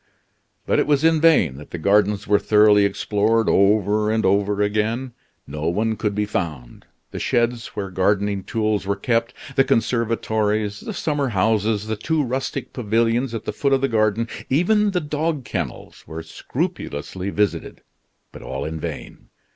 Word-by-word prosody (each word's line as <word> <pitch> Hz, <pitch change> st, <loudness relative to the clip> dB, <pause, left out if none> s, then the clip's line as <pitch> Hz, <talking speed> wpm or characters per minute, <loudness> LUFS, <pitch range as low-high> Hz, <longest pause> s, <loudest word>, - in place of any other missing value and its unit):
But -, -, +2 dB
it -, -, +1 dB
was 145 Hz, -1 st, +2 dB
in 160 Hz, -1 st, +4 dB
vain 120 Hz, -, +4 dB
that 75 Hz, -, -11 dB
the -, -, -5 dB
gardens 100 Hz, +3 st, +2 dB
were 105 Hz, 0 st, +4 dB
thoroughly 105 Hz, -1 st, +5 dB
explored 105 Hz, +3 st, +1 dB
over 105 Hz, +1 st, +3 dB
and 110 Hz, -1 st, +1 dB
over 100 Hz, +1 st, +2 dB
again; 110 Hz, +5 st, -1 dB, 0.3 s
no 75 Hz, +2 st, -4 dB
one 110 Hz, +5 st, 0 dB
could 105 Hz, -2 st, -2 dB
be 105 Hz, 0 st, 0 dB
found. 75 Hz, -12 st, -5 dB, 0.3 s
The -, -, -5 dB
sheds 120 Hz, 0 st, 0 dB
where 100 Hz, -2 st, -4 dB
gardening 100 Hz, +1 st, 0 dB
tools 110 Hz, -2 st, -1 dB
were 100 Hz, -, +1 dB
kept, 115 Hz, -1 st, -1 dB, 0.2 s
the 135 Hz, -, +5 dB
conservatories, 110 Hz, -4 st, 0 dB
the 220 Hz, -, -6 dB
summer 145 Hz, -5 st, -1 dB
houses, 105 Hz, 0 st, +1 dB
the 110 Hz, 0 st, -3 dB
two 155 Hz, +7 st, 0 dB
rustic 130 Hz, +1 st, -3 dB
pavilions 115 Hz, +1 st, 0 dB
at 110 Hz, 0 st, -6 dB
the -, -, -3 dB
foot 140 Hz, -1 st, +1 dB
of 135 Hz, -, +2 dB
the 135 Hz, -, +2 dB
garden, 110 Hz, -1 st, +1 dB, 0.2 s
even 205 Hz, +9 st, +3 dB
the 180 Hz, -3 st, -1 dB
dog 150 Hz, -2 st, -2 dB
kennels, 85 Hz, -, -5 dB
were 80 Hz, +1 st, -7 dB
scrupulously 80 Hz, +2 st, -4 dB
visited, 105 Hz, 0 st, -2 dB, 0.5 s
but -, -, -11 dB
all 65 Hz, +1 st, -5 dB
in 80 Hz, 0 st, -4 dB
vain. -, -, -7 dB
105 Hz, 165 wpm, -22 LUFS, 100-120 Hz, 0.5 s, thoroughly